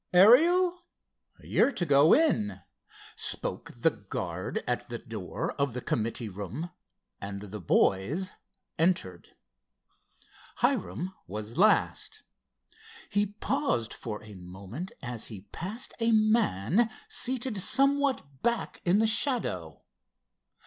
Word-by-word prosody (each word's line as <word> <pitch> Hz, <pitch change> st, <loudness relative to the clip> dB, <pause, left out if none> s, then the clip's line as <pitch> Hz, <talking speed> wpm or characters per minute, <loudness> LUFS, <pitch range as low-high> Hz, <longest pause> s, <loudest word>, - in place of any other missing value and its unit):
"Ariel? 345 Hz, -, +6 dB, 0.6 s
You're -, -, +2 dB
to 185 Hz, -7 st, -1 dB
go 145 Hz, +1 st, +5 dB
in," 105 Hz, -, +3 dB, 0.5 s
spoke -, -, -2 dB
the -, -, +3 dB
guard -, -, -4 dB
at -, -, -2 dB
the -, -, -4 dB
door -, -, -5 dB
of 140 Hz, -4 st, 0 dB
the -, -, -2 dB
committee 115 Hz, +1 st, -2 dB
room—and 100 Hz, -, -8 dB
the 105 Hz, +1 st, -7 dB
boys 120 Hz, -, +1 dB, 0.5 s
entered. 160 Hz, -, 0 dB, 1.2 s
Hiram 115 Hz, -, -1 dB
was 105 Hz, -, -6 dB
last. 215 Hz, +3 st, +2 dB, 0.9 s
He 205 Hz, 0 st, +2 dB
paused 205 Hz, -, -1 dB
for 105 Hz, -2 st, -6 dB
a 105 Hz, -1 st, -11 dB
moment 95 Hz, -, -8 dB
as 120 Hz, -3 st, -5 dB
he 105 Hz, -5 st, -8 dB
passed 215 Hz, +9 st, -4 dB
a 230 Hz, 0 st, +2 dB
man 215 Hz, -, +3 dB, 0.2 s
seated 250 Hz, -4 st, 0 dB
somewhat 270 Hz, -, +2 dB
back 235 Hz, -1 st, -1 dB
in 180 Hz, +3 st, +3 dB
the 220 Hz, -, +3 dB
shadow. 220 Hz, -, 0 dB
170 Hz, 105 wpm, -29 LUFS, -, 1.2 s, Ariel